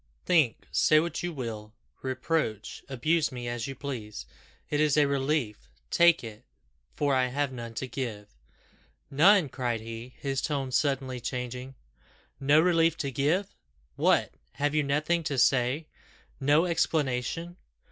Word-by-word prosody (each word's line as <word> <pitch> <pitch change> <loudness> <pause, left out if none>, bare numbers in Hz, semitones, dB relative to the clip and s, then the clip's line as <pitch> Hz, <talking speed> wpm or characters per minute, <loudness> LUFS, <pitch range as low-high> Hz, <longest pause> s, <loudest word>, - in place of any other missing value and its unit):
Think 155 -10 +2
say 155 - +4
what 165 0 -2
you 175 - -3
will 115 -7 -6 0.3
reproach 130 -4 -2
abuse 150 +5 +1
me 120 -1 -6
as 120 0 -3
you 135 - -6
please. 115 - -6 0.4
It 145 - -1
is 150 -1 +3
a 150 - +5
relief 135 - -1 0.2
take 170 -3 +5
it 110 -2 -9 0.5
for 145 -2 +1
I 130 -1 +3
have 140 +2 -1
none 115 -2 -7
to 130 - -3
give." 115 -6 -5 0.8
"None!" 175 +4 +5
cried 125 -3 -2
he, 115 +3 -8
his 135 -1 -2
tone 140 -3 -2
suddenly 135 -2 0
changing, 125 +1 -5 0.6
"no 145 +2 +4
relief 165 -1 +3
to 140 - -3
give! 150 - 0 0.4
What! - - +2 0.2
have 145 +1 -1
you 155 - +3
nothing 150 +4 0
to 140 - -2
say? 130 +4 +2 0.5
No 145 +4 +3
explanation? 165 0 -1
135 Hz, 140 wpm, -28 LUFS, 125-155 Hz, 0.8 s, a